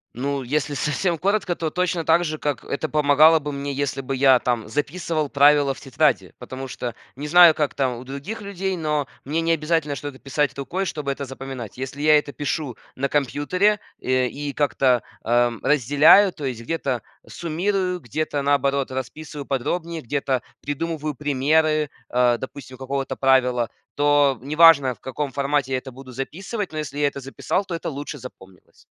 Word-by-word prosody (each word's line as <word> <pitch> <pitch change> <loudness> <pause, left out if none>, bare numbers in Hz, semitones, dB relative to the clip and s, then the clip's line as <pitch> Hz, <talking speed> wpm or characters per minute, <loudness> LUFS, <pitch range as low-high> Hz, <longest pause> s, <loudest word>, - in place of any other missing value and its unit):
Ну, 140 +2 -2
если 145 +3 -1
совсем 155 +5 0
коротко, 195 +1 0
то 165 -2 -2
точно 180 0 -1
так 170 +2 +3
же, 155 -1 -3
как 145 -2 -3
это 155 +2 -3
помогало 150 +2 +5
бы 145 -1 -5
мне, 140 0 -4
если 140 0 -2
бы 135 +1 -4
я 130 -1 +5
там 120 -4 -1
записывал 150 +4 -2
правила 145 0 +4
в - - -13
тетради, 135 -3 0
потому 135 +1 -7
что, 125 -2 -5 0.2
не 145 +3 -5
знаю 175 0 +8
как 150 -2 0
там 130 -3 0
у 120 - -9
других 140 - -6
людей, 195 -1 -3
но 150 -3 -1 0.2
мне 150 +4 -1
не 165 0 +2
обязательно 155 -2 0
что-то 140 -2 -7
писать 140 0 -1
рукой, 175 +8 -3
чтобы 150 -5 -3
это 140 - -6
запоминать. 130 -5 -7
Если 135 +2 -6
я 155 0 +6
это 150 -1 -3
пишу 145 -1 -3 0.2
на 140 +2 -1
компьютере, 150 +9 +1 0.2
эм, 130 0 +1
и 145 +2 -5
как-то, 135 -4 +2 0.2
а, 120 +1 +2
разделяю, 150 - +5
то 155 - -10
есть 125 -4 -3
где-то 130 -3 -2 0.2
суммирую, 180 +2 -2
где-то, 145 +4 -2
наоборот, 140 -1 +1
расписываю 145 +2 -6
подробнее, 160 +5 -2
где-то 135 0 -1 0.2
придумываю 150 0 -3
примеры, 150 +2 +1 0.2
а, 125 -1 +3
допустим, 130 0 -9
какого-то 135 +1 -3
правила, 125 -3 +2 0.3
то 145 -2 +3
неважно, 150 -1 +6
в - - -23
каком 140 +2 -4
формате 140 0 0
я 130 - +1
это 130 +1 -7
буду 130 0 -11
записывать, 185 - -5
но 155 - -3
если 145 -2 -5
я 145 - +3
это 140 0 -5
записал, 135 +8 -2
то 185 -3 -5
это 165 - -4
лучше 145 0 -6
запомнилось. 95 -7 -14
145 Hz, 175 wpm, -23 LUFS, 135-155 Hz, 0.3 s, знаю